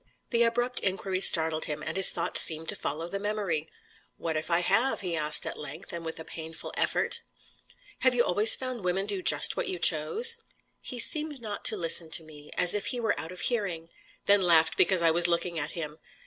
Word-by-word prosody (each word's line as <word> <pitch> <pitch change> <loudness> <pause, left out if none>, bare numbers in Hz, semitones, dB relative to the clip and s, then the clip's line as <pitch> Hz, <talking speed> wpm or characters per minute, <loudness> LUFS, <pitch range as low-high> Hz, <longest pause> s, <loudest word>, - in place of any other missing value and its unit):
The 235 -1 +1
abrupt 240 +2 0
inquiry 190 -1 -3
startled 160 -3 +3
him, 150 0 -6
and 160 - -5
his 190 0 +6
thoughts 170 - +1
seemed 160 0 +1
to - - -1
follow 160 +4 -5
the 200 +3 -5
memory. 200 -7 -3 0.5
"What 160 -1 -4
if 155 +2 -4
I 170 0 +1
have?" 225 +9 0
he 180 -3 -3
asked, 150 -1 0
at - - -6
length, 145 +2 -7
and 170 -1 -6
with 160 0 -7
a 160 - -8
painful 160 0 -9
effort. - - -1 0.8
"Have 255 -1 +2
you 240 - +3
always 210 +4 +5
found 255 -5 -5
women 180 +2 -1
do 200 -2 -4
just 150 -4 +3
what - - -3
you 185 - -3
chose?" 180 - +3 0.4
He 250 - -6
seemed 300 +3 +3
not 220 -3 -6
to 215 - +2
listen 165 -2 +2
to 165 - 0
me; 150 -1 -15
as 180 - +5
if 205 - -1
he 250 - +4
were 225 -3 0
out 160 +3 -6
of 180 - -8
hearing: 185 -9 -2 0.4
then 200 0 +5
laughed 165 -3 +3
because 185 -2 +2
I 165 - +4
was 170 +1 +3
looking 170 -1 -2
at 150 +2 -4
him. 155 -2 -7
175 Hz, 215 wpm, -27 LUFS, 160-210 Hz, 0.8 s, his